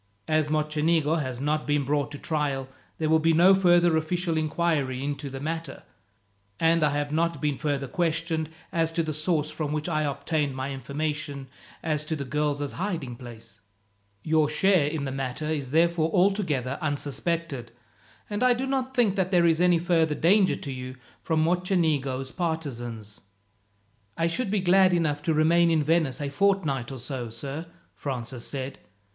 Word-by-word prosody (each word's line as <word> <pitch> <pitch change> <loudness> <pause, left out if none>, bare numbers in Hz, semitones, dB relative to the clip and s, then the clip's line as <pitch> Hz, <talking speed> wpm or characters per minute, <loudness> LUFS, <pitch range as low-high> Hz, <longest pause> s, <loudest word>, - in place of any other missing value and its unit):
As 155 -1 +1
Mocenigo 155 +1 +1
has 130 -3 -4
not 150 +2 -1
been 145 -1 +2
brought 145 +1 0
to 145 - -6
trial, 140 -4 -2 0.3
there 160 - -1
will 160 +1 +4
be 165 +1 +3
no 175 +4 +6
further 175 -3 +4
official 165 +2 0
inquiry 155 -4 0
into 140 0 -3
the 135 0 -6
matter, 160 -1 -5 0.8
and 165 0 +3
I 150 - +4
have 145 0 -2
not 165 +2 0
been 150 -3 -1
further 140 -2 -1
questioned 165 +1 -1 0.2
as 165 -1 +1
to 165 - +1
the 155 -1 -3
source 155 0 0
from 150 -2 -3
which 150 +1 -2
I 155 -3 0
obtained 145 0 -1
my 130 +1 -3
information 145 0 -4 0.3
as 155 -2 0
to 160 - -2
the 140 -2 -4
girls' 145 +1 -1
hiding 165 -10 -3
place. 115 -4 -12 0.6
Your 155 -1 +2
share 180 -1 +3
in 150 -1 -2
the 135 - -3
matter 135 +2 -4
is 150 -4 -2
therefore 165 +2 +2
altogether 180 - +1
unsuspected, 145 -2 -2 0.6
and 205 +1 -3
I 250 -1 +5
do 255 +3 -2
not 265 -1 -2
think 225 -6 +3
that 185 -1 +1
there 175 -2 +4
is 165 0 +3
any 180 -1 +5
further 165 -2 +2
danger 190 +5 +4
to 140 - -6
you 130 0 -6 0.3
from 160 -2 +1
Mocenigo's 160 -7 0
partisans." 120 - -4 1.0
"I 165 - +1
should 195 +7 -1
be 205 -1 +1
glad 185 0 +5
enough 150 -4 0
to 160 +2 0
remain 170 +2 +4
in 160 -2 +2
Venice 155 -4 +1
a 145 -1 -2
fortnight 145 -6 +1
or 135 - -6
so, 125 -1 -5
sir," 140 +8 -6 0.3
Francis 125 -3 -5
said. 135 -1 -5
155 Hz, 170 wpm, -26 LUFS, 140-170 Hz, 1.0 s, no